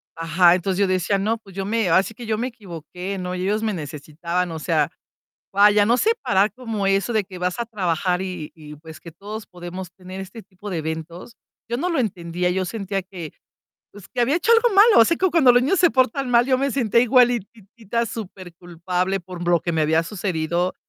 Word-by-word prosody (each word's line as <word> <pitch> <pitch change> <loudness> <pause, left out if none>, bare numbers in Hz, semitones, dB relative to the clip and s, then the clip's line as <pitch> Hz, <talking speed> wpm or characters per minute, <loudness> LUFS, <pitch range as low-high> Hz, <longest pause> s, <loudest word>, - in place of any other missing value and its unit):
ajá, 170 +2 +4
entonces, 185 +1 -2
yo 200 - +3
decía: 185 +2 +1
"No, 215 +4 0
pues 195 -4 -17
yo 195 -1 -3
me 220 -3 0
ahora 185 +3 +5
sí 225 - -8
que 235 +2 -10
yo 220 -1 -1
me 240 +3 -1
equivoqué, 185 - -7
¿no?, 180 -1 -4
ellos 195 +4 -1
me 215 -2 0
necesitaban". 165 +3 -4
O 160 - -5
sea, 155 -2 +1 0.6
vaya, 205 +1 +5
no 235 +3 +3
separar 220 - +2
como 225 -6 -3
eso 195 +4 +1
de 215 -2 +2
que 185 -1 -11
vas 180 +3 -2
a 235 - -1
trabajar, 185 -4 -1
y 180 -5 -6
y 150 -2 -11
pues, 160 +1 -12
que 170 - -11
todos 205 +6 -8
podemos 180 +1 -8
tener 185 +1 -10
este 210 +4 -10
tipo 200 +1 -11
de 175 - -2
eventos. 160 +6 -6 0.3
Yo 235 - -1
no 355 +8 -1
lo 335 - 0
entendía, 180 -5 -2
yo 185 +1 -1
sentía 195 -1 -3
que, 180 -4 -8 0.6
pues, 205 -2 -13
que 245 - -2
había 270 +6 +2
hecho 440 - +1
algo 465 +1 +4
malo. 410 - +7
Así 280 +9 +3
como 375 -1 +1
cuando 295 -7 +6
los 245 0 +4
niños 325 +9 +1
se 345 - +5
portan 260 0 +1
mal, 240 0 +4
yo 260 -1 +2
me 275 +1 0
sentía 235 -3 +2
igualitita 235 -2 +1
superculpable 180 -3 -4
por 175 -1 -8
lo 175 -1 +3
que 170 - -3
me 160 - +1
había 160 +1 +2
sucedido, 175 -1 -2
195 Hz, 210 wpm, -22 LUFS, 175-230 Hz, 0.6 s, malo